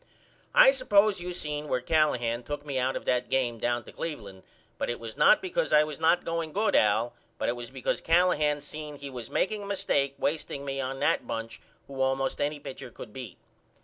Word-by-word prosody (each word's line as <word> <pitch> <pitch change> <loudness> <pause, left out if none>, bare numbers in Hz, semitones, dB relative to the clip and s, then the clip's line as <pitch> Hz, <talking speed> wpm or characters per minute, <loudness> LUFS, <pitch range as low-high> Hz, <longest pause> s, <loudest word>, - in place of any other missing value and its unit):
I - - +9
suppose 215 - +3
you 180 +1 -4
seen 150 -3 -3
where 130 - 0
Callahan 125 -5 +1
took 145 +4 -6
me 140 -3 -2
out 130 +1 0
of - - -5
that 125 0 0
game 120 -3 0
down 120 0 0
to - - -12
Cleveland 105 - -6 0.4
but - - -1
it 120 - -3
was 115 -1 -7
not 300 - +5
because 435 +7 -1
I 150 - +6
was 150 -1 -6
not 165 +2 +3
going 165 -2 -2
good 215 +2 +1
Al 110 +3 +3 0.2
but - - -2
it 120 - 0
was 120 -1 -7
because 130 -1 -2
Callahan 155 -4 +3
seen 150 +1 -7
he 140 -1 -8
was 120 -3 -7
makeing 210 +2 0
a 200 - -7
mistake 140 -8 0
wasteing 145 -2 -2
me 135 0 -2
on 135 +1 -4
that - - +1
bunch 115 0 -5 0.2
who 135 -1 -6
allmost 135 0 0
any 145 +1 -1
pitcher 130 -2 -8
could 110 -2 -11
beat. 125 -8 -8
140 Hz, 210 wpm, -28 LUFS, 125-160 Hz, 0.4 s, I